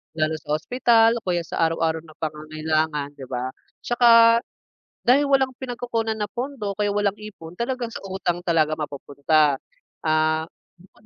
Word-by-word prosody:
lalo 155 0 0
sa 150 - -2
ospital 230 +5 +3
o - - -37
kaya 175 -1 0
sa - - -6
araw-araw 165 0 -1
na 155 -1 -16
pangangailangan, 155 -1 -2
'di 130 - -8
ba. 125 0 -3 0.3
'Tsaka, 230 -1 +6 0.7
dahil 270 +4 +5
walang 265 -1 +3
pinagkukunan 235 -3 -3
na 210 - -1
pondo 235 -2 -4
kaya 205 +1 -1
walang 205 -1 +1
ipon 180 -6 -10
talagang 235 +2 -3
sa - - -7
utang 175 -2 -2
talaga 160 -3 +2
mapupunta. 145 0 +1 0.5
Ah, 155 0 +2 0.3
bukod 190 +4 -23
175 Hz, 145 wpm, -23 LUFS, 155-230 Hz, 0.7 s, Tsaka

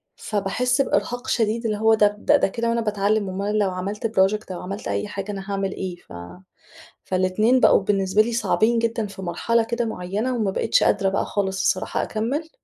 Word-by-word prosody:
فباحس 245 +6 0
بإرهاق 245 -2 -1
شديد 230 +1 0
اللي 210 -2 0
هو 220 +1 +4
ده 210 -1 +3
ده 290 -2 +3
كده 230 +4 -2
وأنا 230 0 +1
باتعلّم 205 -1 0
أُمّال 200 +3 -2
لو 200 -2 +2
عملت 200 +5 -3
project 210 -1 +1
أو 180 - -6
عملت 200 +3 -6
أي - - -2
حاجة 200 0 -5
أنا 195 0 -7
هاعمل 195 -1 -1
إيه؟ 185 -2 -5
ف 175 - -17 0.9
فال2 185 +7 +2
بقوا - - +5
بالنسبة 195 +1 +2
لي 235 +1 -1
صعبين 230 +1 +2
جدًا 230 -2 -1
في 195 -1 -10
مرحلة 225 +6 0
كده 235 +1 -2
معينة 215 +5 -3
وما 210 -4 0
بقيتش - - +2
قادرة 195 -1 +2
بقى 195 - -1
خالص 195 -1 -2
الصراحة - - 0
أكمل. 275 +9 -3
210 Hz, 185 wpm, -23 LUFS, 195-230 Hz, 0.9 s, بقوا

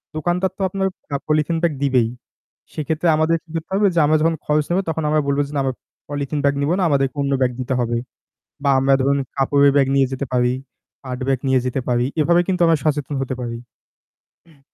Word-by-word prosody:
দোকানদার 175 +4 0
তো - - -7
আপনার 190 +1 -1 0.3
আ - - +2
পলিথিন 155 +2 +1
ব্যাগ 170 -3 +1
দিবেই। 130 -4 +3 0.7
সেইক্ষেত্রে 160 +2 -2
আমাদের 160 +1 +2
কি 165 - -32
করতে 165 +3 -5
হবে? 200 0 +3
যে 165 - +4
আমরা 155 +1 +3
যখন 165 +1 +2
খরচ 150 0 +1
নেব, 175 +2 +2
তখন 160 -1 -2
আমরা 155 0 +2
বলবো 140 +1 +1
যে, - - -11
"না, - - +1
আমরা 130 -1 -1 0.4
পলিথিন 145 0 -3
ব্যাগ 140 0 +2
নিবো 150 +4 +1
না। 185 - +2
আমাদেরকে 135 -1 +1
অন্য 140 0 -1
ব্যাগ 125 -1 +3
দিতে 130 +1 -2
হবে।" 120 0 -1 0.7
বা 140 - +4
আমরা 135 +1 +4
ধরুন 140 +1 +2 0.2
কাপড়ের 140 +1 +4
ব্যাগ 135 -2 +4
নিয়ে 135 -1 +4
যেতে 135 +1 -3
পারি, 125 0 +2 0.5
পাট 125 -1 -5
ব্যাগ 130 -2 +1
নিয়ে 130 -1 +3
যেতে 125 +1 -1
পারি। 120 0 +1
এভাবে 170 +3 +4
কিন্তু 185 -1 0
আমরা 165 -1 +3
সচেতন 145 -2 -1
হতে 130 -1 -3
পারি। 115 -1 -4 0.9
হুম। 155 -4 -23
145 Hz, 210 wpm, -20 LUFS, 135-160 Hz, 0.9 s, যে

